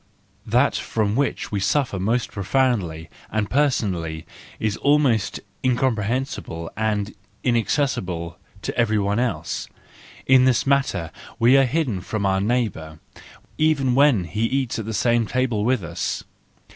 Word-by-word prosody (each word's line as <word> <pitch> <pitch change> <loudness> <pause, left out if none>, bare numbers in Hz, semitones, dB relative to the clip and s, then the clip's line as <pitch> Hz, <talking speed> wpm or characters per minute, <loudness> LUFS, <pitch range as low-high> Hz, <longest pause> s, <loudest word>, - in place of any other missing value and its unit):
—That - - +3
from 105 -2 -1
which 140 +1 -1
we 100 - -1
suffer 100 +1 0
most 115 +5 0
profoundly 100 -7 0 0.2
and 105 -2 -1
personally 95 - 0 0.3
is 110 -2 0
almost 140 -7 +2 0.2
incomprehensible 125 -8 -1
and 110 -1 -1 0.3
inaccessible 95 - -1 0.2
to - - -3
every 115 -3 +2
one 100 +2 0
else: 125 -1 -2 0.6
in 130 -1 +6
this 125 -1 +2
matter 135 - +1 0.3
we 120 +3 +5
are 135 0 +6
hidden 125 - -1
from 100 +2 -3
our 95 0 +2
neighbour 100 -9 -1 0.6
even 145 -5 +2
when 135 -7 +4
he 105 +7 -2
eats 130 -1 -1
at 110 - -4
the 110 - -4
same 115 +1 +2
table 125 -4 0
with 125 -3 +1
us. 85 +1 -3
115 Hz, 130 wpm, -23 LUFS, 100-130 Hz, 0.6 s, in